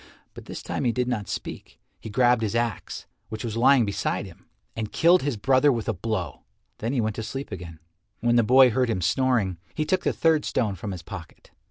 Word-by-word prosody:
But - - -11
this - - -8
time - - -3
he 120 - +2
did 125 +1 -1
not 110 -5 -2
speak. - - -7 0.2
He - - -8
grasped 120 +1 +3
his 110 0 -1
axe, 115 -1 -2 0.2
which 110 +1 -6
was 115 -2 -4
lying 125 +1 +5
beside 100 - -2
him, - - -15 0.3
and 110 -2 -4
killed 175 +2 +4
his 140 -4 -2
brother 135 +6 +4
with 115 -4 -2
a - - +1
blow. 110 +4 -4 0.4
Then 115 - -2
he 135 - 0
went 110 -1 -2
to - - -2
sleep 135 +3 -6
again. 85 -4 -7 0.4
When 120 +1 +2
the 120 - +6
boy 125 +2 +6
heard 125 +1 +1
him 95 -5 -1
snoring, 110 -4 +1 0.2
he 155 - -1
took 185 +4 0
the - - +2
third 160 -2 +2
stone 110 -5 0
from 100 +3 -6
his 90 -5 -7
pocket. 85 -1 -10
115 Hz, 220 wpm, -25 LUFS, 105-130 Hz, 0.4 s, the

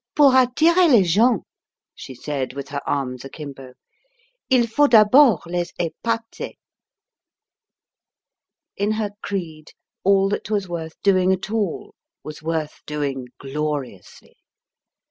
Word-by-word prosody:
"Pour 290 -3 +6
attirer 320 +8 +4
les 235 -8 +6
gens," 210 +6 +3 0.5
she 130 - -10
said, 135 -1 -4
with 140 0 -7
her 140 0 -4
arms 130 -3 -2
akimbo, 135 -2 -10 0.8
"il 255 -3 +4
faut 290 +6 +3
d'abord 225 - +6
les 175 0 -3
épater." 230 +7 -4 2.2
In 205 +2 0
her 215 -2 -2
creed 160 -6 -6 0.3
all 195 0 +4
that 205 - -3
was 205 -3 -1
worth 165 -2 -6
doing 185 -2 +3
at 190 +2 -2
all 210 -6 -2 0.3
was 150 0 -9
worth 160 -1 -3
doing 140 -4 -3
gloriously. 140 -8 -6
175 Hz, 115 wpm, -22 LUFS, 150-220 Hz, 2.2 s, Pour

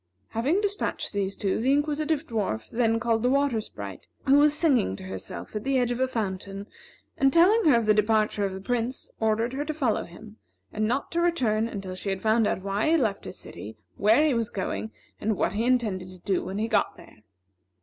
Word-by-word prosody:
Having 280 - +1
despatched 410 - -2
these 200 -1 -1
two, 195 -2 -1
the 255 +4 +2
Inquisitive 300 +1 0
Dwarf 200 - -3
then 230 -1 +2
called 230 -1 +1
the 250 - +2
Water 275 -4 +2
Sprite, - - -9 0.2
who 275 +1 +6
was 300 0 +4
singing 270 - +2
to - - -10
herself 95 - -7
at 210 - -3
the 275 0 +1
edge 245 -1 +1
of 245 - -2
a 260 - +2
fountain, 200 -4 -4 0.5
and 270 0 +4
telling 390 +8 +5
her 245 - +6
of 230 - 0
the 215 - +5
departure 210 0 +2
of 195 -1 -1
the 190 - -7
Prince, 245 +4 -2
ordered 220 +2 +1
her 280 +2 -2
to 305 0 -4
follow 260 -8 0
him, 210 +5 -13 0.4
and 215 0 0
not 255 +5 -1
to 340 - 0
return 235 -11 +1
until 195 -4 -6
she 185 +2 -4
had 195 0 -1
found 220 +1 +3
out 190 - -2
why 200 +7 0
he 330 - +5
left 220 -9 -1
his - - -7
city, 110 +1 -9 0.2
where 225 +9 +4
he 300 - +3
was 230 -2 0
going, 205 +2 -3 0.3
and 215 -2 -1
what 175 - 0
he 220 +3 0
intended 215 -8 0
to 185 - -12
do 185 +1 -1
when 195 - -5
he 220 +2 0
got - - +1
there. - - -15
225 Hz, 220 wpm, -26 LUFS, 200-270 Hz, 0.5 s, who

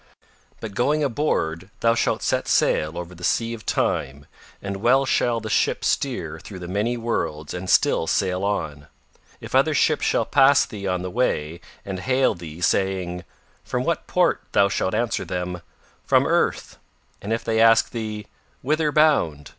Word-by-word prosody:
But 110 -3 -7
going 145 +8 +1
aboard 100 - -1
thou 115 0 +4
shalt 115 - 0
set - - 0
sail 75 +2 +1
over 90 0 -6
the 90 0 -13
Sea 115 +5 0
of 110 -2 -10
Time 70 +2 -1 0.3
and 100 0 -5
well 125 +6 +3
shall 120 -2 +1
the 110 - -7
ship - - 0
steer - - -1
through - - -10
the 90 -1 -7
many 105 +6 -1
worlds 80 -10 -3
and 90 +1 -5
still 80 - +3
sail 95 +1 0
on. 80 -8 -3 0.5
If - - -9
other - - +3
ships - - +2
shall - - +1
pass 140 0 +5
thee 100 -2 -7
on 90 -1 -1
the 90 - -5
way 85 -9 -1 0.2
and 95 -2 -5
hail 130 +5 +2
thee 85 -1 -10
saying: 95 -1 0 0.4
'From - - -2
what - - -2
port' - - +2
thou 100 0 +4
shalt 95 +1 -1
answer 115 +1 -1
them: 90 0 -4 0.4
'From - - +3
Earth.' - - 0 0.4
And 100 - -5
if 115 - -1
they 110 -1 0
ask 115 0 +5
thee 110 -3 -5 0.4
'whither 155 +3 +1
bound? 85 - +2
100 Hz, 170 wpm, -23 LUFS, 90-115 Hz, 0.5 s, pass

